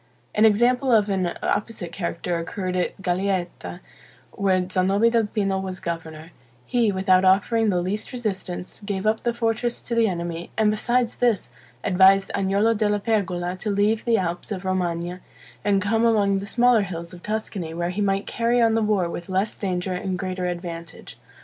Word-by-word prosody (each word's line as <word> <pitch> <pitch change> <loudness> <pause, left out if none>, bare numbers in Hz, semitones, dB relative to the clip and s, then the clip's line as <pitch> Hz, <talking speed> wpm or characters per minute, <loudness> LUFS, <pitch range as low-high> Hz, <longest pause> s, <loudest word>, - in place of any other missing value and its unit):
An 215 - +4
example 245 +5 +3
of 210 -3 +4
an 185 -3 0
opposite 210 -6 -2
character 170 -1 -3
occurred 185 +2 -4
at 180 +1 -1
Galeata, 180 - -2 0.5
where 185 -2 +1
Zanobi 195 +5 +2
del 230 -2 +2
Pino 195 -2 -1
was 190 -1 -5
governor; 165 -1 -6 0.3
he, 235 - +2
without 190 -1 +3
offering 210 +4 +3
the 180 -3 +1
least 200 +4 -3
resistance, 195 -7 -4
gave 200 -1 -3
up 215 +1 +2
the 240 - 0
fortress 235 0 -1
to 240 - -5
the 230 -1 +3
enemy; 170 -2 -4
and 215 -1 +4
besides 240 +2 0
this, 235 -5 +1 0.3
advised 195 0 +5
Agnolo 200 +3 +2
della 210 -1 +1
Pergola 185 -5 -1
to 210 - -4
leave 205 +2 +1
the 230 -2 +2
Alps 175 +1 -3
of 190 -2 -4
Romagna, 175 -1 -2 0.4
and 200 -2 +2
come 225 +2 +1
among 205 -4 +3
the 200 - -6
smaller 245 0 +4
hills 170 -3 -6
of 175 - -11
Tuscany, 210 -5 -4
where 175 +1 -1
he 200 +3 -3
might 195 0 +1
carry 235 +1 +1
on 230 -1 +4
the 225 - +2
war 210 -5 +1
with 170 +1 -7
less 190 +3 0
danger 185 -1 -2
and 185 0 -3
greater 185 -1 -3
advantage. 170 -2 -7
195 Hz, 175 wpm, -24 LUFS, 180-220 Hz, 0.5 s, advised